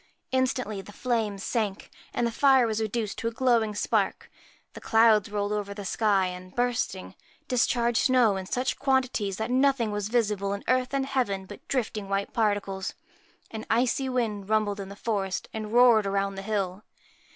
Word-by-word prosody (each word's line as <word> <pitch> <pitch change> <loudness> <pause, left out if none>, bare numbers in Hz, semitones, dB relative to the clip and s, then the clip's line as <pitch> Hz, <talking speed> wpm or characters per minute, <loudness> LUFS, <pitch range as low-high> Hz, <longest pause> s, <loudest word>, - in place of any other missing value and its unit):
Instantly 255 -6 0
the 205 - -12
flames 220 -4 -2
sank, 210 -5 -2 0.2
and 240 - 0
the 235 - 0
fire 265 +1 +5
was 220 -1 -1
reduced 220 -1 -2
to 230 - -2
a - - -1
glowing 230 -3 +1
spark. - - -1 0.4
The - - -10
clouds 225 -2 +4
rolled 205 0 -2
over 205 -1 -3
the 205 -1 -7
sky, 200 -2 +2
and, 180 0 -7
bursting, 245 0 -1 0.3
discharged 240 -2 +2
snow 250 -6 +4
in 190 -1 -5
such 255 +5 -1
quantities 255 -8 0
that 220 +2 -3
nothing 260 -3 +2
was 205 0 -3
visible 210 -4 0
in 200 - -5
earth 255 +1 +1
and 270 -1 0
heaven 245 -8 -1
but 205 +2 -12
drifting 215 -6 -2
white 195 0 -1
particles. 205 -4 -1 0.6
An 220 -1 -6
icy 255 +3 +1
wind 215 -6 -2
rumbled 215 -2 +1
in 195 -1 -6
the 200 - -9
forest 200 -3 -2
and 215 -1 -5
roared 235 -3 +5
round 195 0 -1
the 195 - -5
hill. 195 -1 -2
220 Hz, 175 wpm, -27 LUFS, 200-245 Hz, 0.6 s, fire